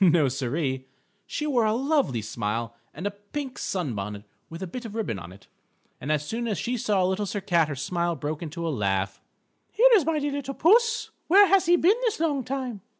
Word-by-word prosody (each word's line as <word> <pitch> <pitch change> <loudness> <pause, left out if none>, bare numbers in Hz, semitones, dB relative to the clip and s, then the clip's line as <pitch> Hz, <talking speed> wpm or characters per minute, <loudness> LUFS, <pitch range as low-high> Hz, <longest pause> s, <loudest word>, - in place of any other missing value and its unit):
No, 165 -6 +5
Siree. 130 0 -2 0.4
She 300 - -3
wore 250 -7 +2
a 215 0 +2
lovely 270 - +1
smile 115 +2 -3 0.2
and 170 +7 -8
a 205 - 0
pink 250 +7 -7
sun 175 -10 -2
bonnet 100 0 -5 0.3
with 165 +3 -7
a - - -2
bit 245 +8 -7
of 225 -2 -8
ribbon 210 - -2
on 85 0 -10
it. 95 - -15 0.6
And 145 - -2
as 150 -1 0
soon 235 +7 -3
as 210 -4 -1
she 245 +1 -2
saw 205 -5 +1
Little 190 +3 0
Sir 205 - -2
Cat 175 -5 +2
her 145 - -4
smile 170 +5 -1
broke 150 0 -4
into 170 +1 -4
a 160 - -1
laugh: 95 -4 -1 0.5
"Here - - +6
is 405 -7 +6
my 320 +1 0
dear 290 -1 -1
little 275 -1 -4
puss. 455 +7 +3 0.2
Where 400 +5 +8
has 390 -3 +3
he 350 - +6
been 375 +7 +3
this 465 -8 0
long 295 -5 0
time?" 255 -4 -4
195 Hz, 215 wpm, -26 LUFS, -, 0.6 s, Where